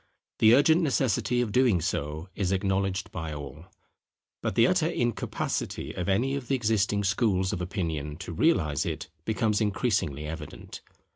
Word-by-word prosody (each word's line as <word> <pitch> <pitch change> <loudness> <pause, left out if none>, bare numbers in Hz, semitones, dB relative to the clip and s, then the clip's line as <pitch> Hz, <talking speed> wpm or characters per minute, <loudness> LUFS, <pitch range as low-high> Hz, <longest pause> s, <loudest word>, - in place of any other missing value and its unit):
The 110 +2 +7
urgent 160 +5 +5
necessity 125 - +1
of 115 -4 -2
doing 120 -6 +3
so 80 -1 -3
is 95 -3 -1
acknowledged 95 0 0
by 80 -2 -5
all; 75 +4 -9 0.7
but - - -2
the - - +6
utter - - +2
incapacity 120 -1 -2
of 90 +1 -3
any 120 +8 +1
of 140 -3 -4
the 135 - +2
existing 105 -4 +1
schools 100 -2 +1
of 90 - -3
opinion 80 -5 -3
to 90 -1 -7
realize 80 - +2
it - - -5
becomes 110 -1 +1
increasingly 100 - 0
evident. 75 -1 -8
100 Hz, 150 wpm, -27 LUFS, 80-115 Hz, 0.7 s, The